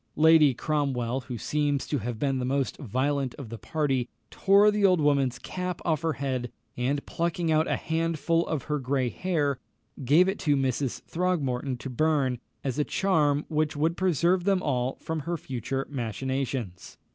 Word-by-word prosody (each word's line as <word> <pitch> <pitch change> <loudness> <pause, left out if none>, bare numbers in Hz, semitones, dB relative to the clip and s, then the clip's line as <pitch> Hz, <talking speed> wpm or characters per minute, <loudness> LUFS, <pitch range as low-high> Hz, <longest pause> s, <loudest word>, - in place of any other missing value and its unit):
Lady 155 -3 +6
Cromwell, 135 -4 -1
who 125 -3 -4
seems 145 +2 0
to 145 - -1
have 120 +1 -4
been 135 +2 0
the - - -2
most 135 +1 0
violent 135 +1 -1
of 135 -6 -8
the 115 0 -7
party, 135 -6 -1 0.2
tore 200 +2 +5
the 210 -1 -1
old 185 -3 +5
woman's 140 -4 +2
cap 180 -1 -4
off 160 -3 +1
her 165 -1 0
head, 130 -3 -3 0.2
and 135 +4 -1
plucking 170 -1 -1
out 155 +1 +3
a - - +1
handful 165 +1 0
of 155 -5 -2
her 150 -1 -2
grey 130 -1 0
hair, 145 -5 -1 0.4
gave 155 +9 +5
it 195 - -1
to 145 -4 +2
Mrs. 135 -1 -1
Throgmorton 140 -8 -1
to 130 - -7
burn, 135 -2 +1 0.2
as 135 0 -2
a - - +3
charm 150 -6 +1
which 155 -1 0
would 160 +3 +1
preserve 180 0 +2
them 195 -1 +2
all 130 -2 0
from 160 0 -4
her 170 +4 -3
future 135 -1 -4
machinations. 130 -5 -4
145 Hz, 170 wpm, -27 LUFS, 130-160 Hz, 0.4 s, Lady